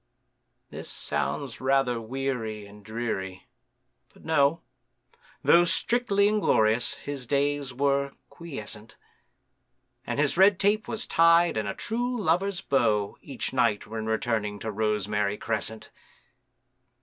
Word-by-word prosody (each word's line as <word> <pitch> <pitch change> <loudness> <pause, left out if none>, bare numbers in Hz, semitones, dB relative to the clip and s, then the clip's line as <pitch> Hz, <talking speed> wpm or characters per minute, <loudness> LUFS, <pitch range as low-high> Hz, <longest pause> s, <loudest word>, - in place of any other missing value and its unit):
This - - -8
sounds 75 - -3
rather 130 -3 +1
weary 115 -3 -3
and 105 +1 -15
dreary; 100 -4 -4 0.7
but, - - -19
no! 160 0 +2 0.8
Though 175 - +6
strictly 200 +2 +2
inglorious, 120 - +2
his 140 -4 -6
days 145 0 0
were 140 +1 0
quiescent, 110 -9 -8 1.1
And - - -2
his 145 +2 +2
red 190 0 +5
tape 210 +2 +2
was 225 - -2
tied 165 +1 +4
in 110 -2 -1
a - - -3
true 245 +2 -2
lover's 190 +1 0
bow 110 - +1
Each 135 -2 -5
night 115 -5 +1
when 110 0 -5
returning 110 -2 -1
to 110 +2 -5
Rosemary 105 -1 -1
Crescent. 110 0 -3
130 Hz, 115 wpm, -27 LUFS, 110-165 Hz, 1.1 s, Though